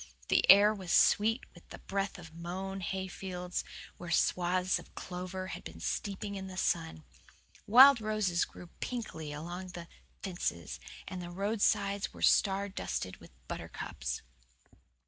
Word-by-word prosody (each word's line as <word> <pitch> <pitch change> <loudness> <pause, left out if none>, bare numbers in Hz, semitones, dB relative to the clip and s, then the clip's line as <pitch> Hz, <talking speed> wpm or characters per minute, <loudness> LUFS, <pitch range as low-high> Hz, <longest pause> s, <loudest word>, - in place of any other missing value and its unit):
The - - +3
air 205 +2 +9
was 190 -5 -6
sweet 225 +4 +4
with 175 - -17
the - - -8
breath 195 0 -3
of 165 -2 -11
mown 185 +3 -5
hayfields 185 -1 -4 0.3
where 175 - -8
swaths 180 +2 +2
of - - -15
clover 185 +1 -5
had - - -6
been 80 0 -9
steeping 200 - -3
in 190 -1 -5
the 185 -1 -8
sun. 160 - 0 0.6
Wild 260 +3 +9
roses 215 -5 +1
grew 175 - -9
pinkly 185 -11 -4
along 175 +5 -6
the 170 -1 -7 0.4
fences, 175 - -3 0.3
and 185 -2 -5
the 175 - -6
roadsides 200 +1 0
were - - -7
star 200 0 +4
dusted 95 - -4
with 85 - -15 0.2
buttercups. - - -5
185 Hz, 140 wpm, -32 LUFS, 175-200 Hz, 0.6 s, air